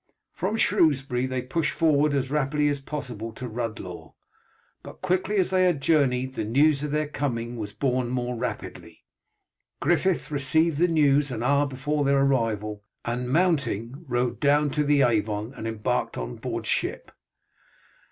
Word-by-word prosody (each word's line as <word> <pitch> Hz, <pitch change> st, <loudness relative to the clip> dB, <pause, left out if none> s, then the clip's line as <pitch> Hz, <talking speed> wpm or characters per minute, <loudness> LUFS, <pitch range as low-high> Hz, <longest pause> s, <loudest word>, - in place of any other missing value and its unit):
From 220 Hz, -, -2 dB
Shrewsbury 135 Hz, -, +2 dB
they 130 Hz, -1 st, -2 dB
pushed 150 Hz, +5 st, -1 dB
forward 150 Hz, -2 st, +3 dB
as 135 Hz, -1 st, -1 dB
rapidly 150 Hz, 0 st, +1 dB
as 140 Hz, -1 st, -2 dB
possible 125 Hz, -6 st, -5 dB
to 125 Hz, +2 st, -6 dB
Rhuddlaw; 115 Hz, -2 st, -6 dB, 0.7 s
but -, -, -12 dB
quickly 185 Hz, +3 st, 0 dB
as 190 Hz, -2 st, +2 dB
they 185 Hz, -1 st, +4 dB
had 175 Hz, -5 st, +2 dB
journeyed, 130 Hz, -4 st, +2 dB
the -, -, -3 dB
news 140 Hz, +6 st, +3 dB
of 150 Hz, -, -2 dB
their 150 Hz, +1 st, 0 dB
coming 120 Hz, -5 st, -3 dB
was 105 Hz, -3 st, -5 dB
borne 125 Hz, +1 st, -1 dB
more 125 Hz, 0 st, -2 dB
rapidly. 115 Hz, -, -6 dB, 0.7 s
Griffith 165 Hz, -4 st, +1 dB
received 150 Hz, +2 st, +1 dB
the 175 Hz, -, +4 dB
news 145 Hz, -3 st, +3 dB
an 120 Hz, -2 st, -4 dB
hour 140 Hz, +3 st, +3 dB
before 145 Hz, +2 st, -1 dB
their 140 Hz, 0 st, +3 dB
arrival, 110 Hz, -6 st, 0 dB, 0.2 s
and 125 Hz, +1 st, -2 dB
mounting, 140 Hz, -, 0 dB
rode 120 Hz, -1 st, -1 dB
down 145 Hz, 0 st, +3 dB
to 150 Hz, +1 st, +1 dB
the 145 Hz, -1 st, +4 dB
Avon 110 Hz, 0 st, 0 dB
and 115 Hz, -, -6 dB
embarked 110 Hz, -1 st, -2 dB
on -, -, -5 dB
board -, -, -4 dB
ship. -, -, -2 dB
135 Hz, 155 wpm, -26 LUFS, 120-150 Hz, 0.7 s, they